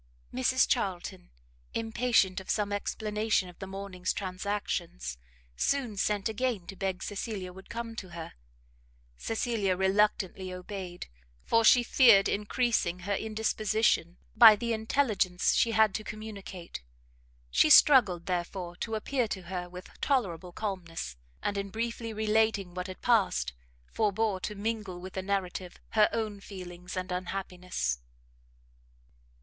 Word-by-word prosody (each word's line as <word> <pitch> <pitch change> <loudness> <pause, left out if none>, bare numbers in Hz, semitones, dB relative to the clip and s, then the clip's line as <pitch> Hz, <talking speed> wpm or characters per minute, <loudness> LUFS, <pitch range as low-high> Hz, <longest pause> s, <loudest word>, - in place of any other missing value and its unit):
Mrs 260 +1 +3
Charlton, 190 -5 -2 0.5
impatient 225 -4 +2
of 190 - -12
some 205 -1 0
explanation 210 -1 0
of 175 - -15
the 195 - -6
morning's 190 -1 -3
transactions, 185 - -3 0.4
soon 255 - 0
sent 205 0 0
again 220 -4 -1
to 195 - -8
beg 190 -1 -3
Cecilia 200 -3 -4
would 190 +1 -13
come 230 -1 -5
to 185 - -6
her. 170 -1 -8 0.8
Cecilia 220 - -1
reluctantly 190 -1 +1
obeyed, 180 -1 -6 0.4
for 230 - +3
she 245 +2 +7
feared 230 -5 +6
encreasing 210 -4 0
her 200 +3 -2
indisposition 215 -4 0 0.2
by 225 -3 +10
the 235 +2 -2
intelligence 220 -5 +1
she 235 - +3
had 220 -2 +4
to 215 - -3
communicate; 200 - -8 0.7
she 110 - +5
struggled, 200 - +7
therefore, 175 0 -3
to 225 +2 -3
appear 245 +2 0
to 190 -3 -5
her 180 0 -5
with 180 +1 -10
tolerable 185 - 0
calmness, 175 - -4 0.3
and 200 -1 -1
in 200 0 -4
briefly 230 +2 -3
relating 215 -3 +1
what 180 +1 -4
had 185 - -9
passed, 190 - +2 0.3
forbore 210 - 0
to 210 +3 -4
mingle 205 -3 -3
with 185 +1 -9
the 190 - -2
narrative 185 -2 -3
her 215 -1 +4
own 215 -3 -2
feelings 180 -2 -8
and 185 0 -3
unhappiness. 180 - -3
200 Hz, 130 wpm, -29 LUFS, 180-220 Hz, 0.8 s, by